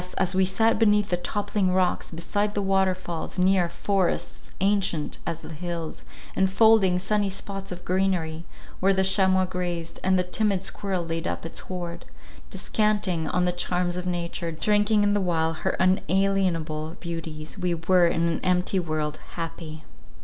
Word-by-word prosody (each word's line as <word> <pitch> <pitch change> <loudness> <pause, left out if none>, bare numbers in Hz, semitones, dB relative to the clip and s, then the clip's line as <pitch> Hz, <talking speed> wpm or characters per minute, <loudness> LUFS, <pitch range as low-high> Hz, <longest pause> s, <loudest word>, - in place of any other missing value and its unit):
as 185 -1 +2
we 190 +1 +3
sat 220 +4 +2
beneath 210 -2 +3
the - - +4
toppling 200 +1 -1
rocks, 185 -1 +1
beside 205 +5 -2
the 205 - +1
waterfalls, 185 -3 -1
near 185 -1 +3
—Forests, 195 0 -1
ancient 195 -5 +1
as 165 -1 -3
the - - -9
hills, 170 0 -5 0.3
And 190 0 +3
folding 210 -4 +5
sunny 205 +2 0
spots 195 0 -6
of 180 0 -7
greenery, 180 -4 0 0.4
where 195 +1 +3
the 190 - +2
chamois 190 -1 +3
grazed, 175 -2 -4
and 190 0 +3
the 180 - +2
timid 195 +1 0
squirrel 190 -2 -3
laid 165 0 -3
up - - -3
its 165 - -3
hoard—descanting 175 - -3
on 180 0 +1
the 180 - +2
charms 180 0 -1
of 180 0 -4
nature, 170 -1 -3
drinking 210 +5 +2
in 205 0 +3
the 205 - +1
while 165 -3 +1
her 190 +4 -2
unalienable 185 -4 +1
beauties—we 165 +1 -4
were, 175 +2 +3
in 170 0 +1
an 165 - -1
empty 180 +1 +2
world, 155 -3 -2 0.2
happy. 160 -2 -6
180 Hz, 155 wpm, -25 LUFS, 170-195 Hz, 0.4 s, folding